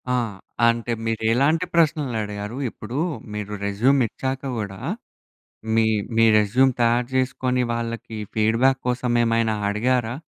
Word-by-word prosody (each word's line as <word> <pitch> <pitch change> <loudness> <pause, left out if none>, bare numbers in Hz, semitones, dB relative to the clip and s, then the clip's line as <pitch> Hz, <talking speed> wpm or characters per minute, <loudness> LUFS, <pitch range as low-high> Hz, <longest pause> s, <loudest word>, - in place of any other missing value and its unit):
ఆ! - - +2 0.5
అంటే 115 0 0
మీరు 115 0 -2
ఎలాంటి 155 +8 +2
ప్రశ్నలు 150 -7 +2
అడిగారు. 105 +3 -6
ఇప్పుడు 115 +5 -7 0.4
మీరు 105 0 -5
రెజ్యూమ్ 120 +8 +2
ఇచ్చాక 130 +4 -4 0.2
కూడా 100 -3 -5 1.0
మీ, 110 -1 +4 0.3
మీ 115 - +5
రెజ్యూమ్ 125 +6 +3
తయారు 120 +1 +2
చేసుకొని 130 -1 0
వాళ్ళకి 115 -1 -4 0.2
ఫీడ్‌బ్యాక్ 115 +5 +2
కోసం 125 0 0
ఏమైనా 115 -1 +1
అడిగారా? 120 +2 0
115 Hz, 120 wpm, -23 LUFS, 110-130 Hz, 1.0 s, మీ